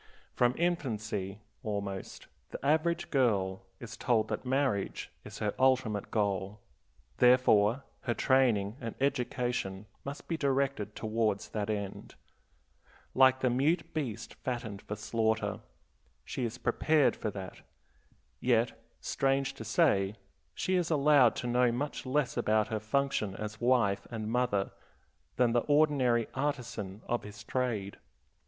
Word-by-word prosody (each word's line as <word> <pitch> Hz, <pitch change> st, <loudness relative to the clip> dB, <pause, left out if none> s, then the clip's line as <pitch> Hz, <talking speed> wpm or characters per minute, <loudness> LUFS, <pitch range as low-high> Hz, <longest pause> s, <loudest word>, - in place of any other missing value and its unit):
From 125 Hz, +1 st, +2 dB
infancy, 110 Hz, -, -2 dB, 0.2 s
almost, 100 Hz, -4 st, -4 dB, 0.2 s
the -, -, -7 dB
average 160 Hz, +3 st, +1 dB
girl 95 Hz, -8 st, +1 dB
is 120 Hz, +1 st, -8 dB
told 110 Hz, -3 st, +1 dB
that 105 Hz, -, -3 dB
marriage 130 Hz, -7 st, 0 dB
is 105 Hz, 0 st, -9 dB
her 105 Hz, -2 st, -1 dB
ultimate 130 Hz, -6 st, +2 dB
goal; 100 Hz, -1 st, -1 dB, 0.6 s
therefore 125 Hz, -1 st, +5 dB, 0.2 s
her 120 Hz, -3 st, 0 dB
training 120 Hz, -5 st, +2 dB
and 115 Hz, -2 st, -5 dB
education 125 Hz, -7 st, -1 dB, 0.2 s
must 140 Hz, +1 st, -7 dB
be 165 Hz, -, -1 dB
directed 135 Hz, -7 st, 0 dB
towards 110 Hz, -2 st, -1 dB
that 105 Hz, -1 st, -3 dB
end. 100 Hz, -2 st, -4 dB, 1.0 s
Like 130 Hz, 0 st, +5 dB
the 125 Hz, -, +2 dB
mute 150 Hz, +8 st, +1 dB
beast 115 Hz, -8 st, -4 dB
fattened 115 Hz, -5 st, -5 dB
for 105 Hz, -, -5 dB
slaughter, 110 Hz, +1 st, 0 dB, 0.7 s
she 125 Hz, -, -3 dB
is 115 Hz, +1 st, -4 dB
prepared 130 Hz, +2 st, +2 dB
for 110 Hz, -, -3 dB
that. 95 Hz, -2 st, -8 dB, 0.8 s
Yet, 120 Hz, -1 st, +2 dB, 0.3 s
strange 135 Hz, 0 st, 0 dB
to 135 Hz, -, -8 dB
say, 105 Hz, -, +2 dB, 0.4 s
she 185 Hz, 0 st, +1 dB
is 175 Hz, -2 st, 0 dB
allowed 145 Hz, -5 st, +5 dB
to 125 Hz, -, -3 dB
know 125 Hz, 0 st, +3 dB
much 135 Hz, +2 st, -3 dB
less 135 Hz, -1 st, 0 dB
about 110 Hz, -2 st, +2 dB
her 110 Hz, -2 st, -1 dB
function 110 Hz, -3 st, 0 dB
as 105 Hz, 0 st, -6 dB
wife 120 Hz, -5 st, +2 dB
and 110 Hz, -2 st, -4 dB
mother 120 Hz, -5 st, +1 dB, 0.6 s
than 125 Hz, -2 st, +3 dB
the 120 Hz, -, +4 dB
ordinary 140 Hz, -6 st, +3 dB
artisan 125 Hz, -8 st, -3 dB
of 120 Hz, -, -1 dB
his 105 Hz, +2 st, -10 dB
trade. 115 Hz, -5 st, -2 dB
120 Hz, 130 wpm, -31 LUFS, 105-135 Hz, 1.0 s, therefore